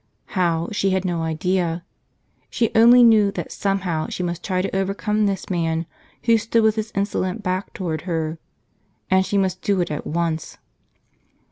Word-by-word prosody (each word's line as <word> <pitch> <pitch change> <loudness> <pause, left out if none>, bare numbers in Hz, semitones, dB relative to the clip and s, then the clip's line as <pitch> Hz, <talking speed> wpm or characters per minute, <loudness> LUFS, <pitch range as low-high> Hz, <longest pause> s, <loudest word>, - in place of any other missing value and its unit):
How, 170 -4 +1
she 195 -2 +1
had 190 0 0
no 175 -2 -1
idea. 170 +1 -1 0.6
She 230 -2 0
only 240 +2 +7
knew 220 -3 +6
that 175 - -5
somehow 185 -5 -1
she 180 - -4
must 175 0 -3
try 185 -2 -1
to 195 - -3
overcome 205 +2 0
this 195 -2 -3
man 165 -2 -1 0.4
who 230 -1 +4
stood 225 +1 +1
with 220 -1 +3
his 220 0 -3
insolent 200 +1 -1
back 185 +1 -2
toward 165 -5 -3
her. 160 -1 -2 0.7
And 190 0 +5
she 190 +2 -1
must 185 -1 0
do 200 -2 +1
it 175 -3 -1
at 150 - -4
once. 165 -1 -2
185 Hz, 165 wpm, -22 LUFS, 170-205 Hz, 0.7 s, only